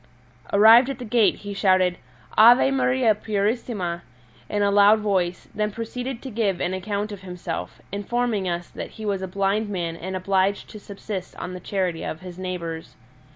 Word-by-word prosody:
Arrived 225 +5 +7
at 275 - -4
the 250 - -7
gate 225 -1 +3
he 205 -1 -7
shouted 185 -2 +2 0.4
Ave 240 +4 +7
Maria 255 -3 +3
purissima 205 -4 -2 0.5
in 205 -1 0
a 200 - +2
loud 205 +2 +6
voice, 185 -4 -1
then 210 0 -1
proceeded 230 +3 -5
to 265 - -6
give 205 -4 0
an 180 - -1
account 200 +2 -3
of 200 -2 -8
himself, 180 -2 -6
informing 205 -1 -1
us 175 0 -3
that - - -7
he 220 - -6
was 200 -2 -1
a 190 - -3
blind 200 +3 0
man 170 -4 -3
and 185 +3 -6
obliged 190 +1 0
to 215 - -9
subsist 200 -2 -7
on 180 - -6
the 180 - -6
charity 180 -3 -2
of 155 - -5
his 180 -1 -9
neighbours. 170 -3 -5
200 Hz, 175 wpm, -24 LUFS, 185-220 Hz, 0.5 s, Arrived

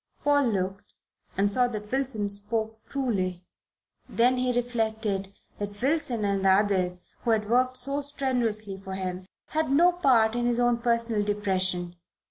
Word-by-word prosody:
Paul 285 -1 +4
looked 195 -3 -3 0.4
and 200 +1 +2
saw 250 +1 +3
that 210 -3 -6
Wilson 255 -6 -1
spoke 220 +2 -3
truly. 190 -10 -1 0.7
Then 250 +2 +3
he 250 0 +1
reflected 220 -5 -1 0.3
that 205 0 -5
Wilson 260 -5 0
and 200 -1 0
the 195 - +4
others 190 -2 +2 0.2
who 240 - -1
had 215 -2 +2
worked 255 +2 +2
so 275 +3 -2
strenuously 245 -8 -1
for 190 0 -6
him 185 -1 -4 0.2
had 310 -2 0
no 340 +6 +6
part 250 -11 +3
in 240 0 0
his 240 0 +1
own 240 -1 +2
personal 230 -3 +1
depression. 185 -4 -1
220 Hz, 150 wpm, -27 LUFS, 200-250 Hz, 0.7 s, no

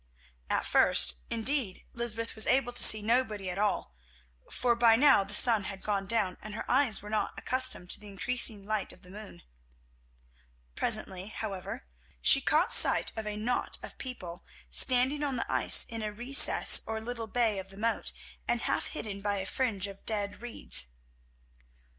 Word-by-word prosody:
At - - -1
first, 60 0 +4
indeed, 230 -3 -3
Lysbeth 230 -1 -3
was 220 - +3
able 245 -1 +1
to - - -3
see 215 -1 +4
nobody 215 -5 -1
at 185 - -6
all, 85 - -2 0.6
for 240 -1 0
by 230 -1 +4
now 270 -4 +4
the 200 +1 -4
sun 225 -5 +5
had 195 -1 -8
gone 200 -2 -3
down 195 -4 -2
and 215 0 -9
her - - -6
eyes 250 -6 0
were 210 - -10
not 215 - -3
accustomed 255 -8 -1
to - - 0
the 210 - -13
increasing 210 0 -3
light 215 -1 -3
of 185 - -20
the 180 - -14
moon. 210 - -11 1.3
Presently, 190 0 -1
however, 205 - -7 0.3
she - - +4
caught - - +1
sight - - +5
of 220 -1 -6
a 210 - -5
knot 240 +4 -2
of - - -11
people 185 -9 -9 0.3
standing 260 +3 +2
on 280 -3 -2
the 235 - -4
ice - - +5
in 230 -1 -8
a 215 -1 -4
recess 245 +6 +6
or 220 0 -4
little 230 0 -7
bay 220 -3 -1
of 190 0 -9
the 195 - -14
moat, 225 - -2 0.4
and - - -1
half - - -2
hidden 200 -2 -7
by 205 0 -2
a 190 - -4
fringe 205 -4 -2
of 195 -1 -10
dead 205 -2 -5
reeds. 65 - -3
215 Hz, 175 wpm, -29 LUFS, 195-240 Hz, 1.3 s, recess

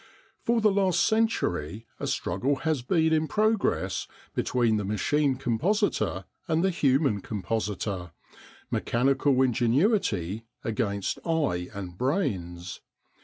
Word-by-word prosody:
For 235 0 +1
the 215 -1 +4
last 195 -2 +2
century 110 - 0
a - - -3
struggle 110 +12 0
has 155 -5 +1
been 160 +4 +2
in 155 0 +2
progress 215 +5 +1 0.3
between 120 -3 +1
the 105 - -1
machine 130 +8 +1
compositor 125 - 0 0.2
and 160 +1 +1
the 190 - +3
human 135 - +2
compositor, 100 -3 -3 0.6
mechanical 135 +2 +2
ingenuity 120 - +1 0.2
against 105 -3 -1
eye 145 - 0
and 90 -2 -7
brains. 90 - -2
125 Hz, 110 wpm, -27 LUFS, 100-160 Hz, 0.6 s, the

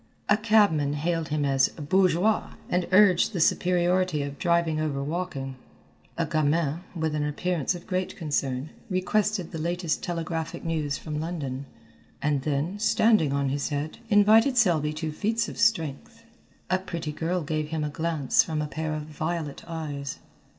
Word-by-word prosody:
A 210 - +5
cabman 205 -10 +3
hailed 165 +2 -1
him 150 -1 0
as 135 -1 +3
"bourgeois," 185 +6 +1 0.2
and 180 0 +1
urged 190 +1 +5
the 180 - -2
superiority 180 -1 +2
of 140 -1 -6
driving 170 -2 +2
over 145 -3 -1
walking. 145 -4 -4 0.6
A 165 - +1
gamin, 155 0 +1 0.2
with 160 -2 -1
an 150 -1 0
appearance 165 +2 -1
of 175 - -9
great 185 0 -2
concern, 145 -3 -2 0.2
requested 190 0 0
the 165 - -5
latest 170 0 -1
telegraphic 165 -2 -4
news 155 -4 -1
from 150 -2 -5
London, 140 -5 -4 0.5
and 145 -2 0
then, 150 +7 -2
standing 215 -7 +3
on 140 -1 0
his 140 +1 -1
head, 145 +1 -3
invited 220 +5 +5
Selby 165 -9 +3
to 155 0 -3
feats 225 +8 0
of - - -8
strength. 165 -12 0 0.5
A 185 - +3
pretty 170 -4 -5
girl 170 +3 -2
gave 155 0 -2
him 155 0 -2
a 150 - -1
glance 155 -3 +2
from 160 -2 -3
a 150 - -1
pair 155 +1 -3
of 155 - -4
violet 155 0 -4
eyes. 145 -4 -5
160 Hz, 155 wpm, -26 LUFS, 150-180 Hz, 0.6 s, A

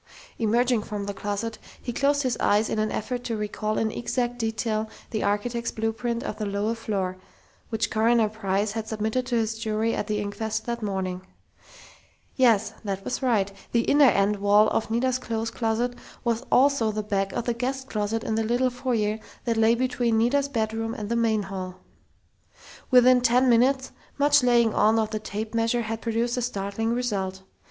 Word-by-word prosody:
Emerging 235 +1 +2
from 210 -1 -5
the 200 - -4
closet 205 +3 -4 0.2
he 240 - -5
closed 285 +3 +2
his 255 -2 0
eyes 210 +2 +2
in - - 0
an 215 0 0
effort 245 +3 -3
to 230 -2 -2
recall 215 0 -2
in 220 -1 0
exact 245 +1 -2
detail 220 -1 -1 0.2
the 215 - -1
architect's 230 +4 -1
blueprint 225 +2 -2
of 215 - -5
the 215 - -1
lower 200 +3 -1
floor, 195 -5 -3 0.5
which 225 0 -1
Coroner 225 0 +3
Price 205 -1 -1
had 220 0 -4
submitted 220 +3 -1
to 245 - 0
his 225 -1 0
jury 220 0 0
at - - -2
the 210 -1 -1
inquest 205 +2 -3
that 235 0 -3
morning. 190 -3 -2 1.1
Yes, 225 -5 +3
that 195 -2 -3
was 250 - -3
right! 215 -7 +1 0.2
The 235 - +4
inner 285 +4 +5
end 200 0 +2
wall 205 +2 +4
of 220 - -1
Nita's 255 +3 +1
clothes 225 -2 -3
closet 230 +1 -1 0.3
was 235 -1 0
also 260 -4 +4
the 215 0 -3
back 195 -2 -1
of 240 - -2
the 240 - +1
guest 260 +3 -3
closet 215 0 -2
in - - -2
the 225 0 +1
little 245 +3 +1
foyer 235 -4 -1 0.3
that 230 -2 +1
lay 225 +1 +4
between 240 -2 0
Nita's 275 +5 +2
bedroom 225 -2 -2
and 210 -1 -5
the 235 - 0
main 225 -3 +2
hall. 185 -1 -6 1.1
Within 250 -1 +6
ten 250 +2 +4
minutes, 260 +3 +3 0.3
much 290 0 +5
laying 240 -3 +3
on 220 +1 +4
of 220 -1 0
the 215 - -2
tape 215 +1 -5
measure 230 +1 +1
had 225 0 -4
produced 235 +2 -1
a - - 0
startling 225 -1 -2
result. 195 -6 -2
225 Hz, 180 wpm, -25 LUFS, 210-240 Hz, 1.1 s, Within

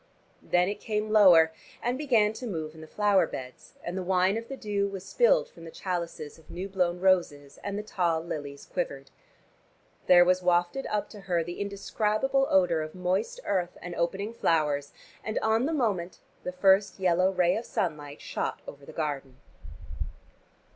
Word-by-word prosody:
Then 180 0 +2
it 205 - -3
came 215 0 -2
lower, 175 -7 +7 0.3
and 245 +1 -1
began 235 -7 +2
to 245 +2 -6
move 160 -6 -4
in 160 - -12
the 160 - -10
flower 205 +1 +3
beds, 125 -1 -9
and 175 - -4
the 190 - -2
wine 185 +2 +2
of 230 +1 -4
the 270 - -6
dew 205 -3 -1
was 195 -1 -7
spilled - - +3
from 165 - -15
the 165 - -8
chalices 170 -4 -5
of 160 - -22
new 185 +3 -5
blown 180 -2 0
roses, 170 -7 +1
and 200 0 -3
the 210 - -3
tall 175 -6 0
lilies 145 -4 -6
quivered. - - -4 1.0
There 175 -1 +8
was 185 +1 +3
wafted 175 +7 +1
up 210 -1 -1
to 210 - -10
her 180 -4 0
the 175 +2 -7
indescribable 215 +6 0
odor 180 -4 +3
of 155 +2 -6
moist 185 - -1
earth 180 -3 -1
and 175 0 -7
opening 190 +6 -2
flowers, 150 -8 +1 0.3
and 215 - -3
on 225 +4 +2
the - - -1
moment 205 - -1 0.2
the 180 - -4
first 190 +2 +3
yellow 185 0 +3
ray 180 -2 +2
of 230 - -3
sunlight 150 -8 -3
shot - - -4
over 140 0 -11
the - - -8
garden. 140 -5 -4
185 Hz, 175 wpm, -28 LUFS, 170-210 Hz, 1.0 s, There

